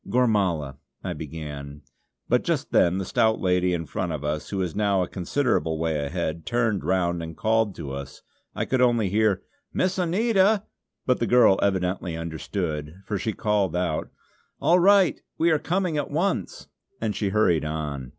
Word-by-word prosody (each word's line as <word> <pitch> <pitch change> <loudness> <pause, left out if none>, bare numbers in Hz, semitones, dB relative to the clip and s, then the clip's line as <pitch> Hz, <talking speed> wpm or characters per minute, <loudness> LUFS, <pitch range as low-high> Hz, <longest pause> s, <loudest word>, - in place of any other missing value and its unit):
"Gormala" 95 - +1 0.3
I - - -3
began; 75 -2 -7 0.4
but - - +2
just - - -1
then 90 +2 +4
the 95 - -2
stout 110 +1 +2
lady 90 -1 +2
in 85 -2 -2
front 90 +2 -3
of 75 -2 -4
us, 75 +1 -3
who 100 - -3
was 90 -4 -2
now 100 -3 +2
a - - -4
considerable 90 - 0
way 80 -2 -1
ahead, 80 +1 -3
turned 115 -1 0
round 85 -2 0
and 80 -1 -7
called 110 -2 +1
to 70 - -6
us. 70 0 -8 0.3
I - - -1
could 130 -1 +1
only 120 -5 +3
hear 105 -1 +2 0.3
"Miss 185 +1 0
Anita;" 200 +3 +3 0.4
but 125 - +2
the 115 - 0
girl 120 -6 +5
evidently 90 -3 0
understood, 80 -1 -4
for 105 -2 -2
she 110 +4 -2
called 100 -5 0
out: 90 -3 -1 0.5
"All 175 +2 +4
right! 195 0 +4 0.2
We 170 +1 +3
are 155 - +3
coming 180 -2 -1
at 145 - -3
once!" 165 - -1 0.3
and 110 -3 -2
she 100 0 -1
hurried 95 -6 +2
on. 75 -4 -4
95 Hz, 170 wpm, -25 LUFS, 80-120 Hz, 0.5 s, girl